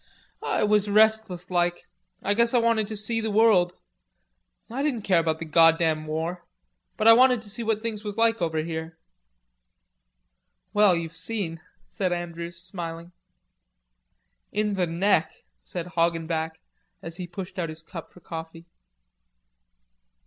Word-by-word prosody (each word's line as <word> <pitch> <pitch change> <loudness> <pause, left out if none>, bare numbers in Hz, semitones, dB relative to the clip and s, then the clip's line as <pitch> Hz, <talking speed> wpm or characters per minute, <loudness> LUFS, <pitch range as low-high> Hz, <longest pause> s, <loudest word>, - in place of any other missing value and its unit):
"I - - 0
was 210 -1 +2
restless 215 -4 +2
like. 175 -1 0 0.4
I 205 - +2
guess 235 +3 +3
I - - +6
wanted 230 -2 +2
to 220 - -5
see 225 +2 0
the 220 - -2
world. 205 -5 +4 0.9
I 250 +4 -4
didn't 270 -7 -1
care 185 -4 +3
about 160 -1 0
the 165 - -6
goddam 160 0 +3
war, 165 +3 -3 0.5
but 220 - +2
I 225 - +11
wanted 250 -1 +5
to 205 - -7
see 235 - -1
what 220 -1 -1
things 220 -2 -4
was 210 0 -5
like 225 -2 +2
over 160 -2 -1
here." 160 0 -5 1.8
"Well, 205 -3 +5
you've 165 -1 -4
seen," 165 -2 -3 0.3
said 185 -2 -2
Andrews, 170 -1 -4
smiling. 170 -2 -7 1.4
"In 210 0 0
the 185 -3 0
neck," 165 -1 +1 0.2
said 175 -2 -5
Hoggenback, 165 -2 -1 0.4
as 165 0 -4
he 180 -2 -5
pushed 185 +1 -7
out 165 -2 -2
his 155 +1 -9
cup 165 -1 -9
for 180 - -17
coffee. 165 0 -8
180 Hz, 145 wpm, -26 LUFS, 165-215 Hz, 1.8 s, I